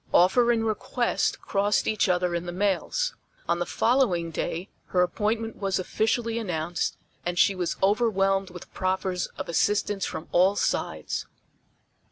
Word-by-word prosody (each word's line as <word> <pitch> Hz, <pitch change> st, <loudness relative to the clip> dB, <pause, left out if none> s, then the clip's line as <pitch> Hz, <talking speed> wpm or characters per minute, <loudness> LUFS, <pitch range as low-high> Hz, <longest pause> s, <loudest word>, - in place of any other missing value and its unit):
Offer 235 Hz, +7 st, +5 dB
and 225 Hz, -1 st, +1 dB
request 230 Hz, +2 st, 0 dB
crossed 205 Hz, +1 st, +1 dB
each 215 Hz, -2 st, +2 dB
other 180 Hz, -1 st, +1 dB
in 170 Hz, +1 st, -2 dB
the -, -, -3 dB
mails. 205 Hz, -, 0 dB, 0.3 s
On 170 Hz, 0 st, +1 dB
the 175 Hz, -, -1 dB
following 205 Hz, -10 st, +2 dB
day 170 Hz, +3 st, -3 dB, 0.2 s
her 180 Hz, -1 st, +3 dB
appointment 220 Hz, +5 st, -1 dB
was 195 Hz, -2 st, 0 dB
officially 225 Hz, +4 st, 0 dB
announced, 175 Hz, -5 st, -2 dB, 0.3 s
and 175 Hz, 0 st, -2 dB
she 200 Hz, -, +5 dB
was 180 Hz, -2 st, -2 dB
overwhelmed 195 Hz, -2 st, +2 dB
with 180 Hz, -1 st, -11 dB
proffers 185 Hz, -1 st, -1 dB
of 190 Hz, -, -5 dB
assistance 205 Hz, +3 st, +1 dB
from 155 Hz, -, -4 dB
all 185 Hz, +3 st, +4 dB
sides. -, -, -2 dB
195 Hz, 145 wpm, -26 LUFS, 180-220 Hz, 0.3 s, Offer